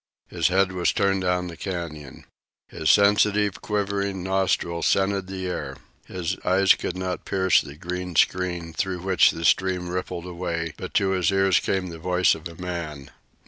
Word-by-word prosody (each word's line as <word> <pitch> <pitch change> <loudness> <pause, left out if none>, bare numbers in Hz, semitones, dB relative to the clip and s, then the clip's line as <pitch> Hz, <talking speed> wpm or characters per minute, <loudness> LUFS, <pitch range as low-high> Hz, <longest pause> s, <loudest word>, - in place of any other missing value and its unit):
His 85 -2 +1
head 95 +1 +2
was 90 -1 +1
turned 100 -3 +1
down 90 0 0
the 85 -2 -7
canyon. 80 -6 -6 0.4
His 80 - -2
sensitive, 105 0 +3
quivering 100 -2 -2
nostrils 95 -3 0
scented 95 -1 +1
the 95 -1 -5
air. 75 -7 -4 0.3
His 90 -3 -3
eyes 95 +1 +5
could 90 - -4
not 95 -1 -3
pierce 95 -1 +3
the 70 -1 -10
green 90 +2 -5
screen 90 -2 +1
through 95 -1 -2
which 95 -1 +4
the 80 - -4
stream 90 -1 +2
rippled 90 -1 -4
away, 85 -3 -4
but - - -8
to 95 -1 +2
his 90 -4 +1
ears 95 -1 +3
came 95 -2 -2
the 85 -1 -9
voice 90 +2 +2
of 80 +2 -6
a 85 - -12
man. 80 -6 -6
90 Hz, 170 wpm, -24 LUFS, 85-95 Hz, 0.4 s, eyes